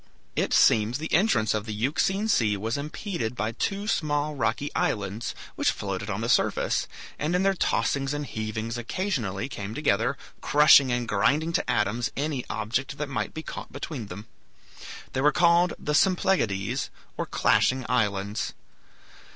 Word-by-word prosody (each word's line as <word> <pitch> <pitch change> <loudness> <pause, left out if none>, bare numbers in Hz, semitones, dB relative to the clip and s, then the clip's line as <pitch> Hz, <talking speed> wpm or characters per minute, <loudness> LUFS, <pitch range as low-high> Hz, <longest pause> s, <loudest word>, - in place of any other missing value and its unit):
It - - 0
seems 110 +3 +4
the 160 +2 -5
entrance 155 - +3
of 110 0 -3
the 105 - -4
Euxine 160 - 0
Sea 110 - +2
was 110 +4 -2
impeded 150 - -4
by 110 -1 -1
two 195 - -2
small 150 -5 0
rocky 140 +1 -1
islands, 100 +2 -2 0.2
which - - +2
floated 100 0 -3
on 100 +1 -2
the 115 - -1
surface, 125 - +1 0.3
and 155 +4 0
in 180 - +2
their 195 0 +3
tossings 140 -6 0
and 145 0 -3
heavings 110 +1 -4
occasionally 120 - -2
came 105 -5 -6
together, 130 -2 +1 0.2
crushing 145 -3 +6
and 120 -1 -1
grinding 145 +11 +1
to - - 0
atoms 105 +2 +1
any 140 -3 -1
object 120 +6 -2
that 150 -1 -3
might 110 -6 -3
be 160 - -5
caught - - -7
between 130 -10 -6
them. 100 +3 -8 0.9
They 130 - 0
were 150 +2 +5
called 170 +1 +4
the 150 - -3
Symplegades, 160 - +1 0.3
or - - -3
Clashing 130 -1 +2
Islands. 105 -3 0
125 Hz, 155 wpm, -26 LUFS, 110-150 Hz, 0.9 s, crushing